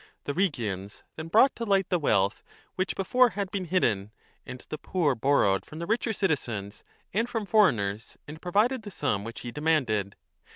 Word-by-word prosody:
The 145 - -3
Rhegians 110 - -2
then 160 +1 -6
brought 230 +10 +5
to 235 - -3
light 195 -4 +2
the 180 - +2
wealth 100 -9 +1 0.3
which 185 0 -2
before 250 +6 +3
had 200 -2 -2
been 195 -2 -2
hidden, 110 - 0 0.4
and 125 0 -8
the 155 - -5
poor 165 -7 +1
borrowed 115 -6 +2
from 155 - -11
the 170 - -4
richer 225 +3 0
citizens 120 - -2 0.3
and 225 +5 0
from 225 -3 -2
foreigners 110 - +2
and 155 +3 -9
provided 210 +9 +2
5 - - -12
the 205 - -8
sum 140 - -1
which 115 +1 -7
he 120 - -6
demanded. 125 -10 0
155 Hz, 180 wpm, -27 LUFS, -, 0.4 s, brought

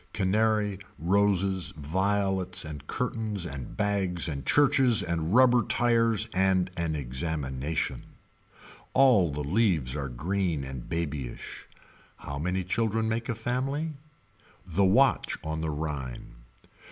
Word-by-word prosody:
Canary, 105 0 +1 0.2
roses, 95 -2 +2
violets 95 +2 0
and 75 -2 -8
curtains 110 -6 -2
and 70 -6 -7
bags 95 -5 0
and 70 -4 -4
churches 135 -6 +4
and 85 +2 -1
rubber 125 -1 +6
tires 115 -1 +2
and 95 -1 +2
an 85 -2 -1
examination. 70 +1 -3 0.9
All 115 - +5
the 75 +1 -4
leaves 80 - +1
are 70 -3 -3
green 85 +3 -1
and 65 -2 -7
babyish. 75 -7 -5 0.5
How 70 0 -6
many 90 +4 -1
children 110 +3 0
make 115 +2 -2
a 115 - 0
family. 135 +7 -2 0.7
The 90 +2 +1
Watch 130 +9 +3
on 80 0 -3
the 80 - -2
Rhine. 75 -6 -5
95 Hz, 115 wpm, -28 LUFS, 75-110 Hz, 0.9 s, rubber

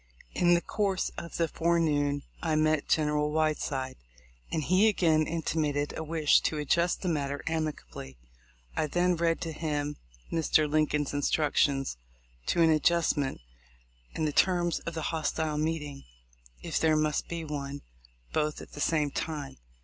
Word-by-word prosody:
In 175 0 +4
the 170 - +1
course 195 -2 -1
of 170 - -6
the 165 - +2
forenoon 150 -4 +1 0.2
I 160 -2 0
met 155 -1 +2
General 150 -1 +2
Whiteside, 150 -4 -1 0.5
and 155 - -1
he 185 +7 +4
again 160 -7 +3
intimated 150 -3 -1
a 160 - -4
wish 155 -1 +3
to 155 - -1
adjust 170 +5 +1
the - - -1
matter 145 -4 -1
amicably. 155 - -4 0.6
I 155 - 0
then 175 +3 +2
read 165 0 +1
to 165 - -3
him 150 -2 -2 0.3
Mr. 155 -2 +3
Lin 155 +1 +2
coln's 145 -1 -1
instructions 145 - +1 0.5
to 170 - +3
an 165 - +5
adjustment, 155 - +2 0.7
and 155 - 0
the - - 0
terms 175 -1 +2
of 170 - -3
the 160 - -3
hostile 155 -1 -1
meeting, 150 -3 -3 0.6
if - - -1
there 160 -1 +3
must 155 0 0
be 170 -1 -4
one, 140 -1 -5 0.5
both 150 -1 0
at - - -11
the 145 - -7
same 150 -3 +1
time. 150 -3 -4
155 Hz, 150 wpm, -29 LUFS, 145-165 Hz, 0.7 s, an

